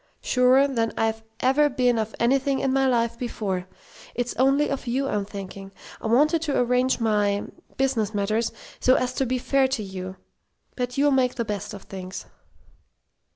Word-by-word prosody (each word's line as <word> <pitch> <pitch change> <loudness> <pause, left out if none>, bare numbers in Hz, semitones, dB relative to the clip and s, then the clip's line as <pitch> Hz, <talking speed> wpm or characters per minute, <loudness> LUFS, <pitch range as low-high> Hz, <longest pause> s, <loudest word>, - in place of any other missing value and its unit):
"Surer 255 +2 +4
than 230 -5 0
I've 225 0 0 0.2
ever 295 +3 +4
been 250 -3 +2
of 220 0 -3
anything 270 +3 +2
in 265 -1 0
my 270 0 +3
life 235 -2 +1
before. 195 -7 -3 0.5
It's 245 0 -2
only 275 +3 +3
of 275 -2 -4
you 265 +3 0
I'm 205 -5 -1
thinking. 195 -1 -8 0.3
I - - -3
wanted 300 +8 +3
to 300 -3 -1
arrange 250 +1 +2
my 205 -3 +1 0.3
business 260 -6 +1
matters 215 +2 0 0.3
so 255 - +4
as 250 0 0
to 265 0 -1
be 255 +2 0
fair 270 +2 +2
to 260 -5 -2
you. 185 -1 -6 0.6
But 250 0 -3
you'll 290 +1 +4
make 255 -2 +2
the 235 - -2
best 205 -1 -4
of 195 - -10
things." 185 -1 -7
245 Hz, 170 wpm, -25 LUFS, 210-265 Hz, 0.6 s, Surer